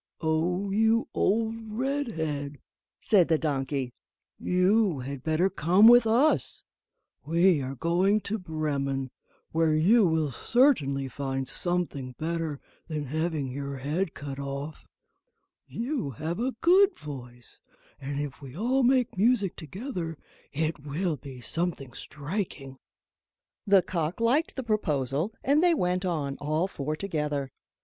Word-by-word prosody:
"O 175 +5 0
you 225 +3 +2
old 225 +2 +1
Redhead," 210 - -2 0.4
said 195 -6 +4
the 160 - +3
donkey, 135 -4 -2 0.5
"you 185 - +2
had 135 +1 -6
better 160 +5 +2
come 190 +3 +5
with 240 -1 +8
us; 250 +8 +2 0.6
we 170 0 +3
are 135 +1 -4
going 180 - +2
to 215 +2 -3
Bremen, 140 -6 -2 0.4
where 160 -1 +2
you 205 +9 +5
will 160 -3 +1
certainly 140 - +2
find 135 -1 -3
something 145 -5 -2
better 160 -2 -2 0.3
than 155 -2 -3
having 155 -1 -2
your 140 +1 -5
head 155 +7 -2
cut 140 -1 -6
off; 140 +2 -6 0.8
you 245 - -3
have 155 - -4
a 255 +1 -1
good 380 +3 +5
voice, 125 -5 -10 0.4
and 140 +1 -4
if 145 0 -5
we 135 +1 -10
all 250 +6 +1
make 255 -1 +2
music 210 -3 +2
together, 175 - -5 0.3
it 155 +2 -1
will 155 +4 -1
be 135 -3 -10
something 160 -4 -3
striking." 145 -3 -5 0.9
The 195 -2 +6
cock 170 0 -2
liked 255 +8 +2
the 265 - -3
proposal, 155 - 0
and 285 +3 +3
they 350 -2 +5
went 180 - 0
on, 145 -6 -2
all 155 +5 0
four 150 -4 -4
together. 150 -7 -2
160 Hz, 130 wpm, -27 LUFS, 140-205 Hz, 0.9 s, with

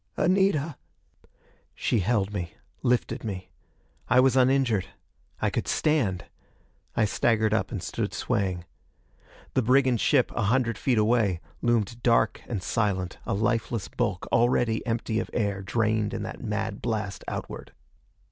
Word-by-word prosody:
"Anita!" 175 -6 +2 1.0
She 115 - +1
held 100 0 0
me, 90 -5 -4 0.3
lifted 125 0 0
me. 95 -4 -5 0.6
I 125 - +5
was 130 -1 +4
uninjured. 130 -6 +3 0.5
I - - +1
could - - -2
stand; 125 - +1 0.7
I 115 - +3
staggered 110 +1 +2
up 110 - 0
and - - -4
stood - - -2
swaying. 95 -3 -1 0.9
The 130 - +3
brigand 130 -1 +3
ship, 135 -4 +3
a 115 - 0
hundred 115 +1 +1
feet 125 -4 +1
away, 105 -5 +2 0.2
loomed 120 -1 0
dark 115 -1 +2
and 105 -6 -3
silent, 95 -5 -1
a - - 0
lifeless 110 -1 -1
bulk, 105 -7 -2
already 115 -1 +2
empty 115 -1 -1
of - - -4
air, 100 -4 -1
drained 110 0 0
in - - -3
that - - -7
mad - - -3
blast 105 -4 -3
outward. - - -6
115 Hz, 140 wpm, -27 LUFS, 100-125 Hz, 1.0 s, I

